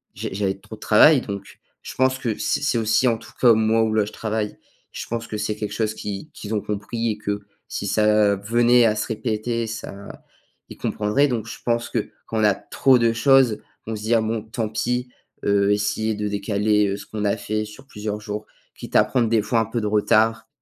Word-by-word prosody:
j'ai - - -5
j'avais 95 -1 -1
trop 110 +2 -11
de - - -22
travail, 130 +7 +6
donc 100 -3 -7 0.2
je - - -7
pense 130 0 +2
que 120 -5 -2
c'est - - 0
c'est 135 -4 +1
aussi, 110 +3 +2
en 115 -2 +2
tout - - -14
cas 120 -2 +7
moi 110 +1 +3
où 110 -1 0
là 105 -2 +2
je - - -8
travaille, 110 -1 -3 0.3
je - - -6
pense 115 -1 -4
que 110 - -4
c'est 105 0 -2
quelque 105 -1 -5
chose 110 -1 -1
qu'ils 105 +7 -6
qu'ils 110 +1 -5
ont 105 - 0
compris 110 +2 -2
et 105 - -4
que 105 -1 -3 0.3
si - - -4
ça 105 0 +3
venait 120 +4 +4
à 110 -1 +3
se 105 - -2
répéter 115 +1 -2
ça 105 -2 -8 0.5
ils - - -10
comprendraient, 105 +8 +1
donc 120 -5 -2
je - - -7
pense 120 0 0
que 115 - -2 0.2
quand 110 - -2
on 110 - +2
a 105 -2 +4
trop 130 +4 +3
de 115 -1 +2
choses, 130 -2 +4 0.3
on 110 - -3
se 105 - -7
dit: 110 +2 0
«Ah 115 - +3
bon, 110 0 -1
tant 110 0 -3
pis!», 125 +3 -1 0.4
heu, 100 0 +3
essayer 105 +1 0
de 105 0 -2
décaler, 105 +1 +1
heu, 100 - -2
ce 100 - -10
qu'on 105 -1 -5
a 105 +2 +1
fait 105 +1 -2
sur 105 +6 -13
plusieurs 105 -4 -5
jours. 105 0 -6 0.3
Quitte - - -9
à - - +7
prendre 120 -4 0
des 110 -2 +2
fois 115 -1 +1
un 115 - +1
peu 115 +2 -3
de - - -3
retard 110 +2 +2
110 Hz, 230 wpm, -22 LUFS, 105-115 Hz, 0.5 s, cas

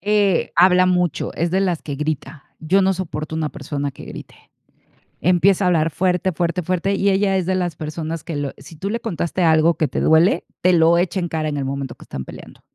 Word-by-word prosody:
Eh, 205 -2 +1
habla 180 +1 +5
mucho, 180 -3 0
es 170 +1 -1
de 190 +2 +1
las 180 -4 0
que 145 - -5
grita. 150 0 -4 0.2
Yo 185 +5 +2
no 190 0 +3
soporto 160 -4 -5
una 155 -1 -1
persona 145 -1 -4
que 130 - -12
grite. - - -10 0.8
Empieza 180 +3 +3
a - - +3
hablar 165 -2 +2
fuerte, 180 +2 0
fuerte, 175 +2 -1
fuerte, 185 +3 -1
y 200 0 +2
ella 195 0 +2
es 180 -2 -1
de 185 - 0
las 175 -4 -2
personas 160 +1 -5
que 165 -4 -5
lo 145 -1 -3
si 140 +4 -13
tú 190 +6 -4
le 235 - -2
contaste 180 -4 -2
algo 160 0 +4
que 155 -2 0
te 130 - -3
duele, 165 +3 +3 0.2
te 185 +1 +3
lo 165 0 +5
echa 180 +2 0
en 175 - -2
cara 155 -1 -2
en 145 - -3
el 140 - -2
momento 135 -2 -4
que - - -14
están 65 -1 -6
peleando, - - -12
170 Hz, 225 wpm, -20 LUFS, 155-185 Hz, 0.8 s, habla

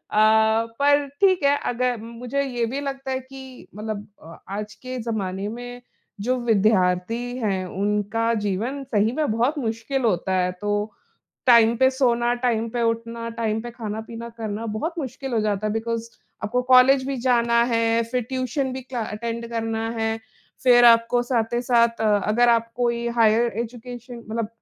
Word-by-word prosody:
अ, 220 +1 +4
पर 285 0 +4
ठीक 375 -5 +4
है, 285 +1 +4
अगर 245 0 -1
मुझे 240 +4 -3
ये 245 -3 -2
भी 280 - -2
लगता 270 -1 -5
है 260 - 0
कि 265 -1 -12
मतलब 210 -1 -5 0.2
अ, 165 +1 -12
आज 210 +2 -5
के 255 0 -7
ज़माने 200 -3 -3
में 245 +2 -7 0.4
जो 250 +4 0
विद्यार्थी 220 +2 +1
हैं, 195 -6 -1
उनका 210 +4 0
जीवन 230 +8 -2
सही 215 +2 +2
में 300 -3 -1
बहुत 250 +7 +1
मुश्किल 230 +2 -2
होता 190 -3 +1
है। 180 0 0
तो 205 +1 -1 0.6
टाइम 235 -1 +6
पे 260 0 +5
सोना, 240 -2 +1
टाइम 235 -2 0
पे 240 0 -2
उठना, 230 0 -2
टाइम 225 -1 -2
पे 240 0 -7
खाना-पीना 225 +1 -6
करना 220 0 -4
बहुत 325 +7 -2
मुश्किल 265 -1 -5
हो 225 - +2
जाता 210 0 -1
है। 210 - -1
बिकॉज़ 230 0 -3 0.3
आपको 250 +4 0
कॉलेज 260 +1 +6
भी 275 -1 -2
जाना 235 -1 +3
है, 230 0 +2
फिर 250 +2 -2
ट्यूशन 260 +1 -2
भी 260 - -5
क्ला 250 -1 -5
अटेंड 230 +2 -5
करना 225 -1 -2
है। 225 0 0 0.5
फिर 245 -1 +7
आपको 230 +1 +5
साथ 240 -2 -1
ही 240 - +1
साथ 235 -2 +2
अ, 210 -2 +3
अगर 240 +3 +4
आप 230 0 +2
कोई 235 -1 0
हायर 230 +1 +4
एजुकेशन 245 +1 -7
मतलब 225 -1 -2
230 Hz, 170 wpm, -23 LUFS, 220-250 Hz, 0.6 s, फिर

